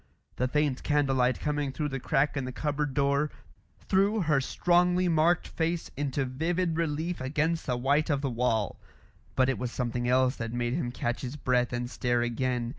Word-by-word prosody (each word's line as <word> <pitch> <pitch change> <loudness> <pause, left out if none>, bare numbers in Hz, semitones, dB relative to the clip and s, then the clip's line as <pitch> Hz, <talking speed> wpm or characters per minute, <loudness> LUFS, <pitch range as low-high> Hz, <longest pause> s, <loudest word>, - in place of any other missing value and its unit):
The 125 - +1
faint 145 -1 0
candle 145 -3 +1
light 125 0 +2
coming 150 -2 -1
through 150 +2 -2
the 135 -1 -3
crack 135 +4 +1
in 135 - -1
the 130 - -4
cupboard 145 0 -2
door, 140 +1 +2 0.6
threw 200 +3 +3
her 155 -5 +2
strongly 180 +5 +2
marked 165 +1 +3
face 165 +1 -2
into 140 -1 -1
vivid 165 +6 -1
relief 165 +1 -2
against 155 +5 -1
the 125 -2 0
white 140 +6 +2
of 140 -2 +1
the 140 - -1
wall. 115 -3 0 0.6
But 130 -1 +3
it 135 - 0
was 125 -1 -3
something 120 -1 -2
else 130 +1 +3
that 115 0 -4
made 120 0 -1
him 135 -5 -1
catch 120 0 -2
his 130 +1 -5
breath 125 -3 +1
and 120 0 -2
stare 120 -1 0
again. 120 0 -1
140 Hz, 190 wpm, -28 LUFS, 125-155 Hz, 0.6 s, threw